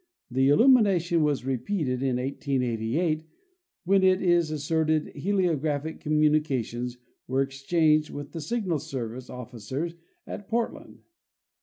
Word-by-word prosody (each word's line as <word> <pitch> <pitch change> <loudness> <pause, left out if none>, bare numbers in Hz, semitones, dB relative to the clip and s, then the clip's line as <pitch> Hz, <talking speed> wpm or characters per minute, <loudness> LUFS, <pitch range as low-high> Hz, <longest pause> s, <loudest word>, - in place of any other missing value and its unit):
The 130 +2 +3
illumination 190 - +4
was 145 -4 0
repeated 130 - -1
in 135 -2 +1
1888, 135 +3 -1 0.6
when 195 +2 +3
it 185 0 +4
is 175 -3 +3
asserted 155 +1 0
heliographic 160 -4 0
communi 155 0 +3
cations 125 -3 -3 0.3
were 130 +2 +2
exchanged 150 +3 +1
with 145 0 -7
the 165 - -5
Signal 185 -2 -1
Service 130 -4 -6
officers 125 +6 -5 0.3
at 205 - -7
Port 230 0 0
land. - - -14
150 Hz, 120 wpm, -27 LUFS, 130-170 Hz, 0.6 s, illumination